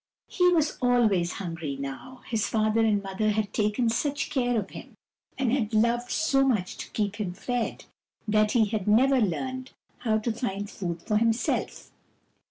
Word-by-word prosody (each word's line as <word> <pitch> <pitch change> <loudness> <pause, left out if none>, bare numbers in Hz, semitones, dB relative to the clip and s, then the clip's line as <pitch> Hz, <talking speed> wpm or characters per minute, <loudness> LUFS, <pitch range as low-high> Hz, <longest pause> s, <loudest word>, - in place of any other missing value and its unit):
He 360 0 +3
was 320 -4 +1
always 220 -8 +3
hungry 165 -6 -5
now. 140 - -7
His 225 -2 -1
father 220 0 +2
and 210 -2 +2
mother 195 +2 -1
had 210 -1 -1
taken 210 +3 +1
such 280 +5 -1
care 245 -4 +1
of 195 - -6
him, - - -10 0.4
and 255 -3 +1
had 225 -5 0
loved 235 +2 +2
so 275 -4 +2
much 215 -9 0
to - - -7
keep 205 -2 -2
him 195 -5 -3
fed, 245 +1 -3 0.4
that 215 0 +3
he 230 -3 +4
had 210 -2 -3
never 255 +5 +4
learned 260 +7 -2 0.3
how 220 -3 +1
to 220 +2 -1
find 205 -4 -3
food 170 -3 -5
for 210 -2 +1
himself. 225 +1 -1
220 Hz, 170 wpm, -27 LUFS, 205-245 Hz, 0.4 s, he